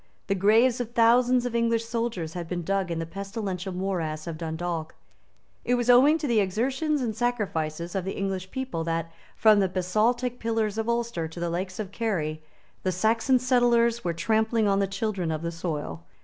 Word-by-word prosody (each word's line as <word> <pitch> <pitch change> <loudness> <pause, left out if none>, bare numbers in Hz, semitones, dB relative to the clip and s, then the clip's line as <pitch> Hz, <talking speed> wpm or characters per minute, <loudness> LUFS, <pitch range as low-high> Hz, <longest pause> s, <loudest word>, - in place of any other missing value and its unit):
The 195 - 0
graves 225 +6 +4
of 240 -1 -6
thousands 245 +2 +4
of 245 - -3
English 230 -1 +1
soldiers 230 -9 -3
had 175 -2 -5
been 175 0 -3
dug 195 +1 0
in 170 - -2
the 165 - -2
pestilential 195 0 -5
morass 175 -5 -3
of 165 -2 -4
Dundalk. 165 0 -4 0.7
It 245 - +2
was 245 0 +3
owing 275 +6 +6
to 315 - -4
the 235 -5 +3
exertions 265 - 0
and 220 -3 -2
sacrifices 175 -9 -2
of 190 - -1
the 190 - -4
English 190 -1 -3
people 260 -9 -3
that, 165 0 -2 0.2
from 215 -2 +5
the 190 -2 +2
basaltic 225 +7 0
pillars 225 -2 -1
of 225 +1 -1
Ulster 235 -8 -1
to 160 +2 -10
the 170 0 -2
lakes 185 +2 -3
of 205 -3 -5
Kerry, 165 -9 -2 0.4
the 185 - 0
Saxon 225 +7 +2
settlers 240 -2 +3
were 175 - 0
trampling 220 +5 +1
on 195 0 +2
the 200 - +1
children 195 -4 -2
of 160 0 -3
the 170 - -2
soil. 150 - -4
200 Hz, 190 wpm, -26 LUFS, 175-235 Hz, 0.7 s, owing